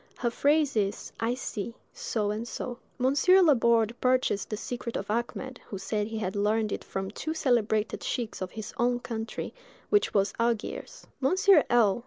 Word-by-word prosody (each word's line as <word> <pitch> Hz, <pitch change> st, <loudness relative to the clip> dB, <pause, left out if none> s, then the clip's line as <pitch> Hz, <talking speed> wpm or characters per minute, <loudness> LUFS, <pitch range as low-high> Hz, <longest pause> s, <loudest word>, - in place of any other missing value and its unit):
Her 240 Hz, -2 st, 0 dB
phrase 290 Hz, +2 st, +2 dB
is: 200 Hz, -2 st, -1 dB
"I 230 Hz, +2 st, 0 dB
see" 230 Hz, -3 st, -5 dB, 0.2 s
so 210 Hz, -3 st, -1 dB
and 220 Hz, +3 st, -4 dB
so. 245 Hz, 0 st, -5 dB, 0.2 s
Monsieur 280 Hz, +9 st, +5 dB
Laborde 235 Hz, -7 st, +4 dB
purchased 255 Hz, -5 st, +2 dB
the 215 Hz, -, -3 dB
secret 240 Hz, +1 st, -4 dB
of 200 Hz, +1 st, -4 dB
Achmed, 240 Hz, +3 st, -3 dB
who 200 Hz, -, -5 dB
said 205 Hz, +2 st, -2 dB
he 225 Hz, 0 st, -5 dB
had 200 Hz, -2 st, -2 dB
learned 210 Hz, +1 st, +1 dB
it -, -, -3 dB
from 195 Hz, 0 st, -4 dB
two 315 Hz, +8 st, -4 dB
celebrated 225 Hz, -6 st, +1 dB
scheicks 235 Hz, -5 st, -3 dB
of 185 Hz, -, -2 dB
his 220 Hz, +1 st, -7 dB
own 245 Hz, +1 st, +2 dB
country, 230 Hz, -2 st, -5 dB, 0.4 s
which 415 Hz, -, +3 dB
was 200 Hz, -1 st, +2 dB
Algiers. 230 Hz, -2 st, -2 dB
Monsieur 360 Hz, +3 st, +5 dB
L. 230 Hz, -3 st, +4 dB
230 Hz, 170 wpm, -28 LUFS, 210-255 Hz, 0.4 s, Monsieur